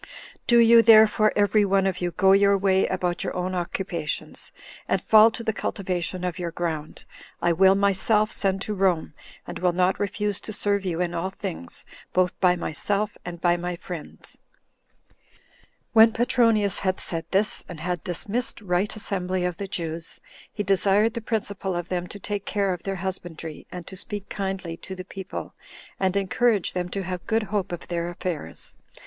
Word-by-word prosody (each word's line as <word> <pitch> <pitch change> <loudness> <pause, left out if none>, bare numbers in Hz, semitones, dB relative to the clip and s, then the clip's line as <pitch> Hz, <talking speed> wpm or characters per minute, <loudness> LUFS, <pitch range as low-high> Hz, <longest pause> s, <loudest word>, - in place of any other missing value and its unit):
Do 240 - +5
you, 230 0 +8
therefore, 215 -1 +6
every 205 +1 +3
one 195 -1 +2
of 185 -1 -1
you, 175 - 0
go 190 +3 +3
your 200 0 +5
way 190 -1 +2
about 180 0 -1
your 185 - -3
own 180 +1 -2
occupations, 175 -2 -3 0.4
and - - +1
fall 220 +1 +7
to 230 +1 -6
the 220 - 0
cultivation 185 -3 -3
of 180 0 -3
your 175 -1 -2
ground; 160 -3 -4 0.3
I 170 - +2
will 190 +3 +5
myself 200 +2 +2
send 195 0 0
to 210 - -3
Rome, 185 -6 +1 0.3
and - - -7
will 180 -1 +2
not 180 +1 +2
refuse 205 0 -1
to - - -6
serve 200 -1 0
you 175 -1 -1
in 175 -1 -1
all 170 +2 -2
things, 85 - -7 0.3
both 180 0 +2
by 180 -2 +4
myself 200 +5 -2
and 175 -1 -7
by 175 0 +3
my 175 0 -3
friends." 170 -2 -7 0.8
6. - - -34 0.8
When 225 0 +8
Petronius 230 -4 +3
had 185 -1 -1
said 165 -2 -2
this, 200 +2 +1
and 170 -3 -8
had 175 +2 -3
dismissed 205 +7 -1
the 180 +4 +1
assembly 185 -3 -2
of 180 -2 -2
the 200 - -4
Jews, 165 -3 -4 0.3
he 205 - -3
desired 200 +3 +3
the 235 - -4
principal 200 -4 -2
of 175 0 -4
them 180 -1 -2
to 205 - -9
take 205 0 -4
care 200 -3 +1
of 175 - -7
their 195 0 -3
husbandry, 175 -4 -5
and 180 -2 -7
to 190 - -9
speak 205 +1 -4
kindly 190 -4 -4
to 190 - -8
the 185 0 -8
people, 190 0 -7 0.5
and 190 0 +1
encourage 200 +1 +1
them 180 -1 -2
to 195 +1 -3
have 180 -1 -5
good 225 0 +1
hope 200 -3 0
of 175 - -6
their 170 -1 -2
affairs. 170 - -5
190 Hz, 180 wpm, -25 LUFS, 175-205 Hz, 0.8 s, you